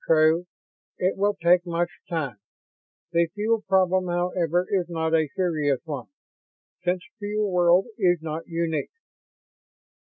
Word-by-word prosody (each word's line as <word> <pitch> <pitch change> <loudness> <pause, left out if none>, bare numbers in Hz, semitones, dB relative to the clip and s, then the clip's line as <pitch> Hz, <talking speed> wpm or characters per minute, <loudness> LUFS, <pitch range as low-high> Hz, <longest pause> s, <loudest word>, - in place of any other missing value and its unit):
"True. 160 +2 +4 0.5
It 185 +1 +1
will 205 +1 +1
take 175 0 +4
much 175 0 -1 0.2
time. 145 - -3 0.7
The 170 0 +3
fuel 220 +2 +1
problem, 185 -2 +2
however, 175 0 0
is 185 -3 0
not 160 -1 -1
a 160 -2 +3
serious 155 -8 +1
one, 145 -5 -5 0.8
since 180 0 0 0.2
Fuel 210 0 -1
World 180 +1 +4
is 175 -3 +3
not 160 0 -5
unique. 165 -2 -2
175 Hz, 125 wpm, -25 LUFS, 160-185 Hz, 0.8 s, True